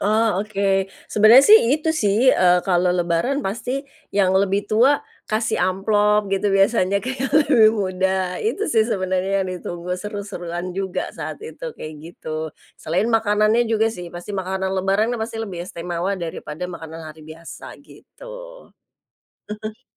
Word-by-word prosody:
Oh 215 Hz, -1 st, +2 dB
oke. 195 Hz, -2 st, 0 dB, 0.2 s
Sebenarnya 220 Hz, +6 st, +7 dB
sih 435 Hz, +1 st, +8 dB, 0.2 s
itu 315 Hz, +1 st, -1 dB
sih, 230 Hz, -2 st, +3 dB
eee, 180 Hz, -1 st, +4 dB
kalau 180 Hz, -1 st, +2 dB
lebaran 180 Hz, +10 st, 0 dB
pasti 240 Hz, +7 st, -3 dB, 0.3 s
yang 190 Hz, -2 st, +3 dB
lebih 195 Hz, +1 st, +1 dB
tua 240 Hz, +7 st, +3 dB, 0.2 s
kasih 220 Hz, +1 st, 0 dB
amplop 210 Hz, +2 st, +2 dB
gitu 195 Hz, +1 st, +1 dB
biasanya 195 Hz, 0 st, +2 dB
ke 260 Hz, -, -2 dB
yang 270 Hz, -, 0 dB, 0.2 s
lebih 220 Hz, -5 st, +6 dB
muda. 185 Hz, -1 st, -1 dB
Itu 425 Hz, -1 st, -1 dB
sih 220 Hz, 0 st, +3 dB
sebenarnya 190 Hz, -1 st, 0 dB
yang -, -, -5 dB
ditunggu 175 Hz, 0 st, -5 dB
seru-seruan 185 Hz, -4 st, -5 dB
juga 190 Hz, 0 st, -3 dB
saat -, -, -6 dB
itu 470 Hz, +2 st, -9 dB
kayak 155 Hz, -, -7 dB
gitu. 160 Hz, -1 st, -6 dB, 0.3 s
Selain 180 Hz, +7 st, 0 dB
makanannya 220 Hz, +1 st, +2 dB
juga 225 Hz, 0 st, +1 dB
sih 180 Hz, -4 st, -8 dB
pasti 175 Hz, +4 st, -8 dB
makanan 190 Hz, 0 st, -2 dB
lebaran 195 Hz, +5 st, +1 dB
pasti 225 Hz, 0 st, -4 dB
lebih 185 Hz, -5 st, -5 dB
istimewa 175 Hz, +3 st, -3 dB
daripada 170 Hz, -1 st, -6 dB
makanan 165 Hz, -2 st, -8 dB
hari 160 Hz, -, -17 dB
biasa 155 Hz, +2 st, -11 dB
gitu. -, -, -13 dB, 0.9 s
Heeh. 215 Hz, 0 st, -7 dB
195 Hz, 145 wpm, -21 LUFS, 180-220 Hz, 0.9 s, sih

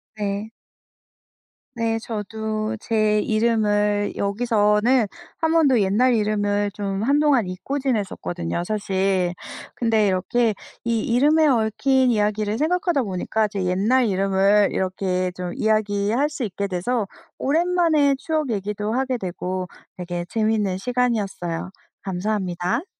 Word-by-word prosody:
네. 205 Hz, 0 st, -3 dB, 1.3 s
네 225 Hz, -1 st, 0 dB
저도 220 Hz, 0 st, -3 dB
제 215 Hz, -2 st, +1 dB
이름을 210 Hz, -2 st, +1 dB
여기서는 215 Hz, +3 st, +2 dB, 0.3 s
한 320 Hz, -1 st, 0 dB
번도 295 Hz, -7 st, +4 dB
옛날 225 Hz, +6 st, +3 dB
이름을 205 Hz, -1 st, 0 dB
좀 195 Hz, 0 st, -3 dB
한동안 280 Hz, -2 st, +3 dB
잊고 185 Hz, +10 st, -4 dB
지냈었거든요, 190 Hz, -9 st, -2 dB
사실. 190 Hz, -2 st, 0 dB, 0.4 s
근데 225 Hz, -3 st, +2 dB
이렇게 210 Hz, +4 st, +1 dB, 0.3 s
이 230 Hz, -1 st, 0 dB
이름에 295 Hz, +8 st, +3 dB
얽힌 260 Hz, +1 st, +2 dB
이야기를 210 Hz, -1 st, 0 dB
생각하다 345 Hz, -, +1 dB
보니까 210 Hz, +2 st, -1 dB
제 200 Hz, -2 st, -4 dB
옛날 210 Hz, +8 st, +2 dB
이름을 195 Hz, +1 st, +3 dB
이렇게 185 Hz, -1 st, -1 dB
좀 180 Hz, -1 st, -4 dB
이야기할 215 Hz, +5 st, +1 dB
수 285 Hz, -, -4 dB
있게 200 Hz, 0 st, -3 dB
돼서 200 Hz, +5 st, -1 dB, 0.3 s
오랜만에 320 Hz, -2 st, +2 dB
추억 310 Hz, -1 st, -2 dB
얘기도 210 Hz, +1 st, -2 dB
하게 260 Hz, 0 st, 0 dB
되고 185 Hz, 0 st, -4 dB, 0.3 s
되게 175 Hz, -1 st, -4 dB
재미있는 215 Hz, -4 st, 0 dB
시간이었어요. 210 Hz, -8 st, -1 dB, 0.3 s
감사합니다. 190 Hz, -, -2 dB
215 Hz, 275 characters per minute, -22 LUFS, 195-245 Hz, 1.3 s, 번도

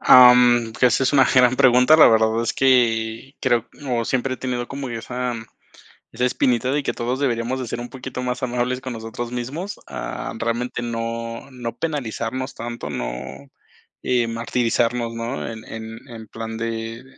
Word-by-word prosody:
Ah, 125 Hz, -1 st, +9 dB
mm, 120 Hz, -2 st, +4 dB
esa 125 Hz, +1 st, +4 dB
es 130 Hz, -, +2 dB
una 135 Hz, -2 st, +6 dB
gran 125 Hz, -1 st, +4 dB
pregunta. 125 Hz, +4 st, +6 dB
La 160 Hz, -, +9 dB
verdad 110 Hz, 0 st, +3 dB
es 115 Hz, -, -1 dB
que 120 Hz, -1 st, +2 dB
creo 120 Hz, -3 st, +1 dB, 0.2 s
o 120 Hz, -2 st, 0 dB
siempre 130 Hz, +2 st, -1 dB
he -, -, -10 dB
tenido 125 Hz, -1 st, -3 dB
yo 120 Hz, -, -9 dB
como 140 Hz, -1 st, -5 dB
esa 125 Hz, +2 st, -3 dB, 0.8 s
esa 120 Hz, +2 st, -2 dB
espinita 125 Hz, 0 st, +1 dB
de 145 Hz, +1 st, 0 dB
que -, -, -1 dB
todos 125 Hz, +3 st, -2 dB
deberíamos 125 Hz, -1 st, -1 dB
de 125 Hz, -, -4 dB
ser 115 Hz, -, -4 dB
un 120 Hz, -, -7 dB
poquito 130 Hz, -1 st, -6 dB
más 125 Hz, 0 st, -2 dB
amables 125 Hz, 0 st, -1 dB
con 130 Hz, -1 st, -5 dB
nosotros 115 Hz, +1 st, -6 dB
mismos. 140 Hz, +11 st, -5 dB
Ah, -, -, -5 dB
realmente 120 Hz, +2 st, -2 dB
no 115 Hz, +1 st, -4 dB
no 120 Hz, -2 st, -6 dB
penalizarnos 130 Hz, -3 st, -3 dB
tanto, 120 Hz, +1 st, -6 dB
no, -, -, -3 dB, 0.9 s
eh, 120 Hz, -2 st, +1 dB
martirizarnos, 115 Hz, 0 st, 0 dB
¿no? 115 Hz, +3 st, -4 dB
En 110 Hz, -1 st, -8 dB
en 110 Hz, 0 st, -8 dB
en 110 Hz, -2 st, -9 dB
plan 115 Hz, +1 st, -6 dB
de, 115 Hz, +1 st, -4 dB
120 Hz, 170 wpm, -22 LUFS, 115-125 Hz, 0.9 s, Ah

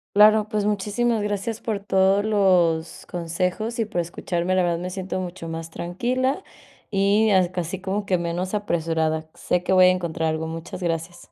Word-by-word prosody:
Claro, 215 Hz, +1 st, +6 dB
pues 210 Hz, -2 st, -1 dB
muchísimas 210 Hz, +3 st, 0 dB
gracias 210 Hz, +2 st, -3 dB
por 215 Hz, -3 st, -2 dB
todos 195 Hz, 0 st, +2 dB
los 180 Hz, -6 st, +2 dB
consejos 180 Hz, +7 st, -2 dB
y 225 Hz, -, +2 dB
por 205 Hz, -5 st, -1 dB
escucharme. 175 Hz, +1 st, -2 dB
La 185 Hz, -, +3 dB
verdad 170 Hz, -1 st, +1 dB
me 180 Hz, +2 st, -4 dB
siento 185 Hz, 0 st, -4 dB
mucho 180 Hz, -1 st, -6 dB
más 165 Hz, 0 st, -5 dB
tranquila, 250 Hz, -, -1 dB, 0.5 s
y 205 Hz, +2 st, +3 dB
as 190 Hz, -2 st, +5 dB
c 175 Hz, -, -8 dB
así 175 Hz, +3 st, -5 dB
como 195 Hz, +2 st, -2 dB
que 185 Hz, -2 st, +2 dB
menos 175 Hz, +2 st, -3 dB
apresurada, 160 Hz, -5 st, -1 dB
sé 180 Hz, 0 st, -1 dB
que -, -, -1 dB
voy 185 Hz, -1 st, +7 dB
a -, -, +7 dB
encontrar 170 Hz, -3 st, -1 dB
algo, 160 Hz, 0 st, -1 dB
muchas 165 Hz, +3 st, -6 dB
gracias. 170 Hz, +1 st, -4 dB
185 Hz, 180 wpm, -23 LUFS, 170-205 Hz, 0.5 s, voy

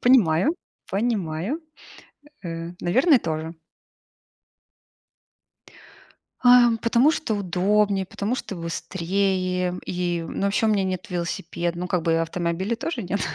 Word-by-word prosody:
Понимаю, 245 Hz, -, +4 dB, 0.4 s
понимаю, 200 Hz, -, -1 dB, 0.8 s
э, 165 Hz, 0 st, -5 dB
наверное 260 Hz, -, +4 dB
тоже. 160 Hz, -3 st, -4 dB, 2.8 s
А, 245 Hz, -2 st, +7 dB
потому 240 Hz, +5 st, +4 dB
что 310 Hz, -8 st, -1 dB
удобнее, 200 Hz, +1 st, +1 dB
потому 205 Hz, +5 st, -2 dB
что 235 Hz, -, -5 dB
быстрее 180 Hz, +1 st, -1 dB
и 175 Hz, -2 st, -1 dB
ну, -, -, -4 dB
вообще, 200 Hz, +3 st, +2 dB
у -, -, +3 dB
меня 205 Hz, -3 st, +2 dB
нет 185 Hz, +3 st, -3 dB
велосипеда. 170 Hz, 0 st, -3 dB
Ну, 180 Hz, -, -3 dB
как 180 Hz, -1 st, 0 dB
бы, 165 Hz, 0 st, +2 dB
автомобиля 170 Hz, +6 st, -2 dB
тоже 250 Hz, -1 st, -4 dB
нет. 195 Hz, +2 st, -2 dB
185 Hz, 110 wpm, -24 LUFS, 170-225 Hz, 2.8 s, А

